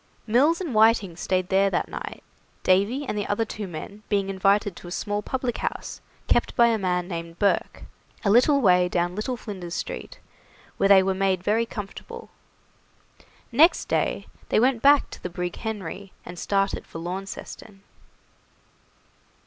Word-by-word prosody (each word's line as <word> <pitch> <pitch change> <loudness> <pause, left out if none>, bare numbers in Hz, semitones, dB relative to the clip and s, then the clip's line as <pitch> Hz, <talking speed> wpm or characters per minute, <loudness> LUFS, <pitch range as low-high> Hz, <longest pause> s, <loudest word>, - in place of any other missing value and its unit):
Mills 275 +9 +3
and 340 -9 -4
Whiting 215 -5 +4
stayed 185 +1 -1
there 195 +1 +3
that 180 - -1
night, - - -7 0.4
Davy 205 +10 +2
and 255 - -3
the 205 -1 -2
other 215 +2 0
two 210 -2 -6
men 185 +5 -8
being 200 -2 +1
invited 195 0 +2
to - - -11
a - - -8
small 205 +2 -2
public 255 +1 -3
house - - -4 0.2
kept - - +1
by 235 -1 +5
a 225 -1 +1
man 180 -2 -1
named 170 -2 -6
Burke, 200 +1 0 0.4
a 200 - +4
little 275 +5 +5
way 180 -4 +4
down 175 0 0
Little 215 +6 -3
Flinders 185 -7 -7
Street, - - -6 0.6
where 195 - +2
they 195 -1 +7
were 190 0 +1
made 190 -1 0
very 225 +4 +1
comfortable. 205 -3 -8 1.2
Next 310 +9 +5
day - - 0 0.2
they - - +3
went 245 0 +2
back 285 0 +5
to - - -10
the 180 - -4
brig 180 0 -4
'Henry', 205 -3 -6
and 175 0 -8
started 195 -1 -1
for - - -9
Launceston. 195 +3 -7
200 Hz, 160 wpm, -25 LUFS, 185-225 Hz, 1.2 s, they